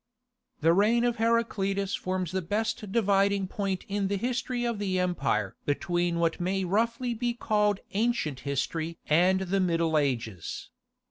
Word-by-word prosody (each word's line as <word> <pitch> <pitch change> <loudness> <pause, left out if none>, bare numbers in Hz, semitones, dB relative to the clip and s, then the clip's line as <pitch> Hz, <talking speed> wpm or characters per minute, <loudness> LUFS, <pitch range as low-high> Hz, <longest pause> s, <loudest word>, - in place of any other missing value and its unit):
The 165 +2 +5
reign 220 +6 +3
of 240 -1 +1
Heraclius 200 -4 0
forms 185 -2 -2
the 190 0 -1
best 210 +2 -2
dividing 200 -2 +2
point 195 -1 -3
in 200 -1 -1
the 200 +1 -1
history 245 +2 -2
of 235 -3 -1
the 190 -2 -1
empire 135 - 0
between 175 +4 0
what 165 -1 +1
may 190 +2 0
roughly 230 +6 0
be 240 +1 -1
called 210 -3 +1
Ancient 205 - 0
History 160 +4 -2
and 180 +5 +3
the 190 +1 0
Middle 165 -3 +2
Ages. 115 - -3
195 Hz, 145 wpm, -28 LUFS, 170-215 Hz, -, The